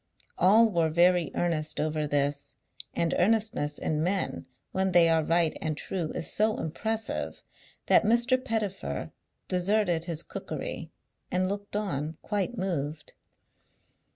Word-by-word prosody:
All 215 +5 +6
were 165 -3 +2
very 175 0 +4
earnest 160 -3 -1
over 155 0 0
this; 145 0 -1 0.4
and 170 -1 +1
earnestness 210 -7 +1
in 155 0 -1
men, 180 - -1 0.2
when 190 0 0
they 170 -1 +6
are 160 -1 +3
right 165 0 +2
and 155 -2 -2
true, 170 -3 -3
is - - -1
so 215 +1 +2
impressive, 220 +8 -3 0.4
that - - +6
Mr. 240 +4 +2
Pettifer 205 - -3 0.4
deserted 180 -2 +1
his 165 -2 -3
cookery - - -5 0.4
and 185 +1 +1
looked 205 +1 -5
on 160 -7 -2
quite 205 +3 -2
moved. 155 -6 -3
175 Hz, 125 wpm, -28 LUFS, 155-205 Hz, 0.4 s, All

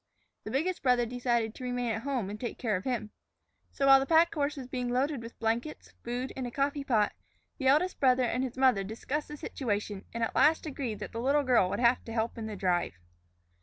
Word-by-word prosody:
The - - -4
biggest 340 +7 -1
brother 250 -2 +3
decided 235 -2 -1
to 255 - -10
remain 245 -1 -1
at 220 0 -2
home 250 -7 -2
and 210 - -7
take 240 - -4
care 220 -4 0
of 185 - -4
him. 235 -5 -2 0.6
So, 275 - -1
while 270 0 +8
the 270 - -2
pack 330 +1 +5
horse 290 -1 -1
was 265 - -6
being 250 -1 -3
loaded 265 +2 0
with 230 0 -10
blankets, 230 +6 -2
food, 245 +2 -3
and 260 -2 -3
a - - -4
coffee 280 +2 -1
pot, 220 -6 +2 0.5
the 265 - 0
eldest 310 +7 +3
brother 255 -2 +4
and 250 +1 0
his 260 -1 -5
mother 255 -7 +4
discussed 245 +8 -4
the 295 - -8
situation 210 -7 -3
and 230 0 -3
at 225 - -1
last 320 +2 +4
agreed 265 -7 -4
that - - -5
the 230 - -4
little 285 +3 +2
girl 245 -8 +3
would - - -2
have 240 +1 +3
to 225 - -7
help 225 0 -1
in 220 - -4
the 215 - -5
drive. 180 - 0
250 Hz, 230 wpm, -30 LUFS, 225-275 Hz, 0.6 s, while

